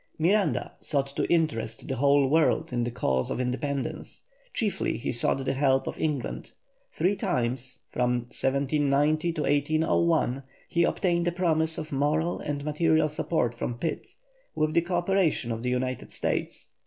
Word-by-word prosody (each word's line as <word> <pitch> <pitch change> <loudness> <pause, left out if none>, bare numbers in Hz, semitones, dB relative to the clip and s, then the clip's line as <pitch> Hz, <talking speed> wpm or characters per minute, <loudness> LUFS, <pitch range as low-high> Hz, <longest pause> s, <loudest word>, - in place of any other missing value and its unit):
Miranda 195 +6 +2
sought 140 -2 -1
to - - +1
interest 115 -10 0
the 135 - -2
whole 140 +1 +4
world 155 0 +2
in 120 -1 +1
the 120 - -1
cause 65 - 0
of - - -2
independence; 135 +2 -3 0.3
chiefly 210 -6 -1
he - - -2
sought 130 +2 0
the - - +1
help 135 -1 +2
of - - -5
England. 150 -5 -3 0.4
Three 190 +3 +1
times 130 - -2 0.2
(1790 140 +5 +1
1801) 155 -1 +1 0.3
he 170 0 +2
obtained 175 -1 +1
a - - +2
promise 160 -2 +1
of 155 - -5
moral 150 +5 +1
and 145 -1 -4
material 155 0 +2
support 150 -5 0
from 120 0 -4
Pitt, 165 +5 -3 0.5
with 155 0 +1
the 170 - +4
co 175 +2 -2
operation 175 -8 +1
of 115 0 -3
the 125 - -1
United 125 0 -2
States. - - -2
145 Hz, 150 wpm, -27 LUFS, 130-165 Hz, 0.5 s, whole